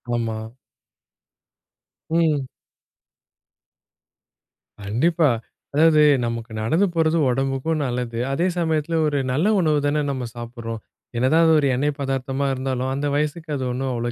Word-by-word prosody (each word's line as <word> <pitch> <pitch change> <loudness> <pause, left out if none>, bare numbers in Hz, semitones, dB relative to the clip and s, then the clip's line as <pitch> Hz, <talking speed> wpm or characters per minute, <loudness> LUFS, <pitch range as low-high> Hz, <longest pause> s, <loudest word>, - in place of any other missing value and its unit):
ஆமா. 115 -2 -2 1.7
ம். 155 -5 +1 2.4
கண்டிப்பா. 155 +11 +2 0.5
அதாவது 155 0 +5 0.2
நமக்கு 115 -1 -4
நடந்து 160 - +2
போறது 165 0 +2
உடம்புக்கும் 135 +4 -1
நல்லது. 120 -2 -3
அதே 170 +6 +1
சமயத்தில 160 0 0
ஒரு 145 -1 0
நல்ல 155 +10 +1
உணவு 155 -4 +2
தானே 150 +1 +1
நம்ம 130 -3 -4
சாப்பிடுறோம். 115 -2 -6 0.4
என்னதான் 145 +7 +4
அது 160 - +5
ஒரு 140 - +2
எண்ணெய் 145 +2 -1
பதார்த்தமா 135 0 -2
இருந்தாலும், 130 0 -2
அந்த 140 +2 -1
வயசுக்கு 150 +2 -2
அது 130 - -3
ஒண்ணும் 130 +1 -2
அவ்ளோ 120 0 -2
135 Hz, 120 wpm, -22 LUFS, 125-155 Hz, 2.4 s, அதாவது